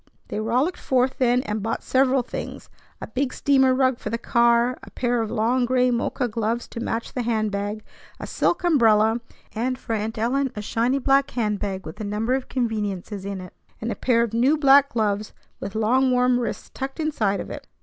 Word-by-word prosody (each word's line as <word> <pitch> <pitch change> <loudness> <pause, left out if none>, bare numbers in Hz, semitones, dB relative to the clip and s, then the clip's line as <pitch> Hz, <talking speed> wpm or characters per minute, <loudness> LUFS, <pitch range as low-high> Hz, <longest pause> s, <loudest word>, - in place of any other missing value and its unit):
They - - -3
rollicked 250 +11 0
forth 255 0 +1
then, 250 0 +3
and 210 -2 -3
bought 225 - -3
several 260 0 +2
things, - - -7 0.3
a - - -5
big 265 0 -2
steamer 265 -1 +3
rug 260 -2 +2
for - - -5
the 230 - -1
car, 235 +1 +3
a - - -12
pair 245 -1 0
of 220 - -3
long 240 +3 +1
gray 250 0 +2
mocha 245 +1 -1
gloves 230 +1 -2
to - - -7
match 230 0 -3
the 250 - -2
hand 220 -3 0
bag, 205 +2 -3 0.4
a - - -5
silk 350 - 0
umbrella, 225 -8 +4 0.3
and 250 +3 -1
for 230 - -5
Aunt 220 +1 -2
Ellen 260 +4 0
a 210 - -4
shiny 235 +5 0
black 275 +1 +2
hand 210 -4 -1
bag 190 -2 -4
with 160 +7 -8
a - - -3
number 210 +4 -1
of 265 -1 -2
conveniences 210 -5 -3
in 200 -1 -4
it, 180 - -11 0.3
and 230 +1 -3
a - - -3
pair 235 -2 +2
of 230 -2 -4
new 260 +7 +3
black 280 -1 +6
gloves 215 -3 -1 0.3
with 195 +1 -6
long, 250 +5 +3
warm 250 0 +3
wrists 240 - -4
tucked 270 +3 -5
inside 235 -11 0
of - - -6
it. - - -8
235 Hz, 205 wpm, -23 LUFS, 215-260 Hz, 0.4 s, black